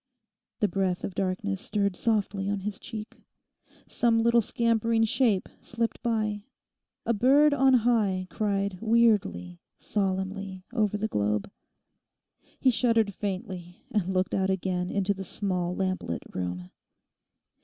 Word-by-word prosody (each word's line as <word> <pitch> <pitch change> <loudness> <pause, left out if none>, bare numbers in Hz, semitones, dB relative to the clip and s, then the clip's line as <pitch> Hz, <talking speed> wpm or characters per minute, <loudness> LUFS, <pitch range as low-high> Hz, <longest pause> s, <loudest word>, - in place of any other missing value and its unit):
The 210 - +4
breath 190 -3 -1
of 195 - -3
darkness 195 +1 -2
stirred 200 -2 0
softly 205 -3 0
on 200 -1 -1
his 205 0 -4
cheek. 215 -1 -8 0.7
Some 230 -1 +2
little 235 0 +5
scampering 230 0 +1
shape 225 -3 +2
slipped 230 0 -3
by. 215 -3 -1 0.6
A 235 - +2
bird 280 +7 +5
on 270 -1 +5
high 215 -6 +2
cried 200 -3 -1
weirdly, 210 - +2 0.2
solemnly, 190 -1 -2
over 210 -4 +1
the 215 +1 -1
globe. 105 - -1 1.1
He 260 - +4
shuddered 230 -4 +2
faintly, 185 -3 -5
and 195 -4 0
looked 185 0 0
out 190 -1 +1
again 185 -1 -1
into 200 0 +1
the 195 0 -6
small 180 -2 -2
lamplit 185 - -2
room. 90 0 -4
200 Hz, 125 wpm, -27 LUFS, 185-225 Hz, 1.1 s, little